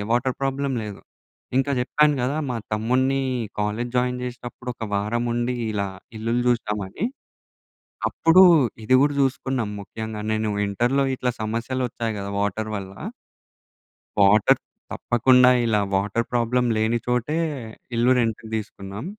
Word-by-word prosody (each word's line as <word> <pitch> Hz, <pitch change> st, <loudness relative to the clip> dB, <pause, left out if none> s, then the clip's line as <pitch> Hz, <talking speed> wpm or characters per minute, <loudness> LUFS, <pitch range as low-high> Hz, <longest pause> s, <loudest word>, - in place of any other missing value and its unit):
Water 125 Hz, +2 st, +1 dB
problem 135 Hz, 0 st, -1 dB
లేదు. 105 Hz, -2 st, -7 dB, 0.6 s
ఇంకా 135 Hz, +1 st, +2 dB
చెప్పాను 150 Hz, +4 st, +3 dB
కదా! 130 Hz, +4 st, 0 dB
మా 120 Hz, -, -1 dB, 0.2 s
తమ్ముడిని 130 Hz, +5 st, +1 dB, 0.4 s
కాలేజ్ 105 Hz, +4 st, -2 dB
జాయిన్ 125 Hz, 0 st, +1 dB
చేసేటప్పుడు, 125 Hz, 0 st, -7 dB
ఒక 115 Hz, -, -6 dB
వారం 105 Hz, +4 st, 0 dB
ఉండి, 120 Hz, +1 st, -1 dB, 0.2 s
ఇలా 100 Hz, -1 st, -1 dB, 0.3 s
ఇల్లులు 115 Hz, +3 st, 0 dB
జూసినామని. 105 Hz, -, -1 dB, 1.0 s
అప్పుడు 165 Hz, +3 st, +5 dB, 0.4 s
ఇది 130 Hz, +4 st, +4 dB
కూడా 145 Hz, +1 st, +3 dB
చూసుకున్నాం 130 Hz, -4 st, -1 dB
ముఖ్యంగా. 110 Hz, +1 st, -6 dB
నేను 110 Hz, 0 st, 0 dB, 0.2 s
ఇంటర్‌లో 120 Hz, +7 st, +1 dB
ఇట్లా 125 Hz, -1 st, -1 dB
సమస్యలొచ్చాయి 115 Hz, +1 st, -2 dB
కదా! 100 Hz, 0 st, -5 dB
వాటర్ 105 Hz, +2 st, -2 dB
వల్ల. 95 Hz, -1 st, -6 dB, 1.3 s
వాటర్ 100 Hz, +1 st, +5 dB, 0.3 s
తప్పకుండా 125 Hz, +1 st, +4 dB
ఇలా 110 Hz, -3 st, +2 dB
వాటర్ 105 Hz, +4 st, 0 dB
ప్రాబ్లమ్‌ 120 Hz, +1 st, +1 dB
లేనిచోటే, 120 Hz, +5 st, 0 dB, 0.6 s
ఇల్లు 120 Hz, +2 st, +3 dB
రెంట్‌కి 115 Hz, -1 st, -1 dB
దీసుకున్నాం. 105 Hz, 0 st, -5 dB
120 Hz, 120 wpm, -23 LUFS, 110-125 Hz, 1.3 s, అప్పుడు